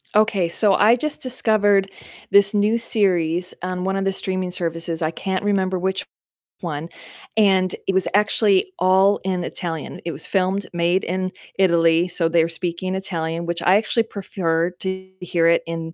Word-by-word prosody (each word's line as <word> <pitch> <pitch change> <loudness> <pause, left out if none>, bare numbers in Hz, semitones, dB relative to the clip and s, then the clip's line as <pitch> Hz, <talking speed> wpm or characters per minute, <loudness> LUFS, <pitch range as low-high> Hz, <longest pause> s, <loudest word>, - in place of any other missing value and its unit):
Okay, 210 -4 +3
so 195 +3 +2
I 220 +3 +5
just 300 +4 -4
discovered 205 -6 +2 0.4
this 200 0 +5
new 210 +2 +2
series 180 -6 0
on 180 0 -3
one 190 +1 -1
of 195 0 -1
the 195 - +1
streaming 185 -1 -3
services, 165 -1 -3
I 155 - +1
can't 185 +4 -3
remember 190 -2 0
which 190 +1 -1 0.6
one, 165 -1 -4 0.5
and 190 -3 +3
it 195 - +1
was 190 0 +1
actually 210 - +2
all 190 +2 +4
in 185 -2 -1
Italian. 165 -4 -5
It 170 - -3
was 150 0 -5
filmed, 190 +1 0
made 175 +2 +1
in 185 +1 -2 0.3
Italy, 170 -2 +3
so 175 -2 0
they're 165 0 +2
speaking 175 +2 -3
Italian, 170 -3 -3
which 170 0 -3
I 185 - +4
actually 220 +2 +2
prefer 180 -5 -2
to 190 +1 -5
hear 170 -2 0
it 170 0 +4
in 165 0 -5
185 Hz, 165 wpm, -21 LUFS, 170-195 Hz, 0.6 s, I